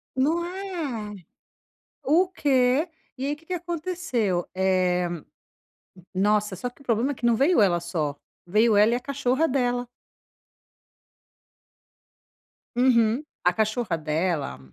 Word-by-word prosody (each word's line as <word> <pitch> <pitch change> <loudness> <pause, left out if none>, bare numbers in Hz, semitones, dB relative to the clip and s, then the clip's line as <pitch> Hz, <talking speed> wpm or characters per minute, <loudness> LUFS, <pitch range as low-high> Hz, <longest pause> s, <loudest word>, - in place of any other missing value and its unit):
Não 310 +6 +1
é. 335 - -5 0.9
O 325 +7 +3
quê?! 275 -2 +2 0.3
E 265 - -2
aí 285 - 0
o - - -18
que 315 - -22
que - - -6
aconteceu, 325 - -2
eh, 185 -1 +2 1.1
nossa 205 +1 +1
só 245 +7 -4
que 280 - -23
o - - -15
problema 235 +4 +1
é - - -2
que 245 - -5
não 235 -1 +4
veio 275 +2 +4
ela 180 -4 +3
só, 160 -4 -2 0.3
veio 215 +4 +3
ela 210 +3 +5
e - - +2
a - - -1
cachorra 275 +2 0
dela. 245 -2 0 2.9
Uhum. 240 0 +3 0.2
A 180 - +4
cachorra 215 -3 0
dela 155 - -2
240 Hz, 130 wpm, -25 LUFS, 190-285 Hz, 2.9 s, ela